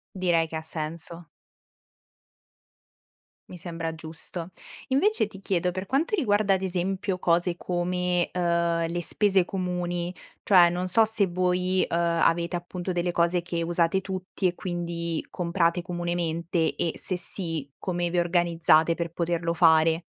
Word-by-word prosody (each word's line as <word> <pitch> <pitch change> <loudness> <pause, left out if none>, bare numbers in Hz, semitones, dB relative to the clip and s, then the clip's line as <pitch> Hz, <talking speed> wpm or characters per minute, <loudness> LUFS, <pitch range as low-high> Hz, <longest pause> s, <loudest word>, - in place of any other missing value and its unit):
Direi 175 -3 +2
che 160 - -6
ha 160 - -3
senso. 165 +1 -6 2.2
Mi 180 - -9
sembra 165 -1 -4
giusto. 165 +2 -7 0.4
Invece 375 - +2
ti 195 -2 -12
chiedo, 180 -2 0
per 185 +2 -5
quanto 285 - 0
riguarda 205 - +2
ad 190 - -2
esempio 190 +1 -1
cose 175 0 +1
come, 180 0 -1
uhm, 170 -1 +1
le 175 +1 -3
spese 195 0 +3
comuni, 180 -1 -3 0.3
cioè 175 -4 +6
non 180 +1 -2
so 220 +5 +4
se 215 -2 +2
voi, 180 +1 +1
uhm, - - -1
avete 170 0 +1
appunto 175 +1 -4
delle 175 0 0
cose 170 0 +1
che 170 -1 -3
usate 170 +2 +1
tutti 190 0 -3
e 175 - +1
quindi 170 -2 -3
comprate 170 0 0
comunemente 170 -1 -1
e 165 - 0
se 185 - -2
sì, 165 -5 -3
come 175 -2 -2
vi 175 - 0
organizzate 170 -2 +3
per 170 0 -3
poterlo 170 0 -1
fare? 160 0 +4
175 Hz, 140 wpm, -26 LUFS, 170-185 Hz, 2.2 s, cioè